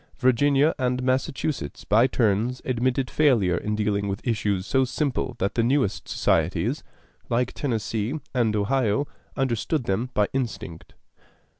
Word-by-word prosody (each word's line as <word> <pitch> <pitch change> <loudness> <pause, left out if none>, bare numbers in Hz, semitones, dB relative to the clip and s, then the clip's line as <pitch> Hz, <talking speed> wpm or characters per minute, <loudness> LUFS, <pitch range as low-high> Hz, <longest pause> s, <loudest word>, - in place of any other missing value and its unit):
Virginia 140 +4 +3
and 125 0 0
Massachusetts 130 - -2
by 115 +5 +4
turns 115 +1 +1
admitted 130 +1 0
failure 120 - +3
in 105 +4 -2
dealing 100 -1 0
with 100 +5 -4
issues 105 -5 0
so 135 +2 +2
simple 130 -1 -2
that 100 0 -1
the 115 - +1
newest 125 -3 +1
societies, - - 0 0.5
like 125 +1 0
Tennessee 115 +1 -2
and 115 -4 +1
Ohio, 115 +3 +1 0.3
understood 135 +2 0
them 115 +3 -1
by 105 -1 +3
instinct. 115 -10 -4
120 Hz, 130 wpm, -25 LUFS, 105-130 Hz, 0.5 s, by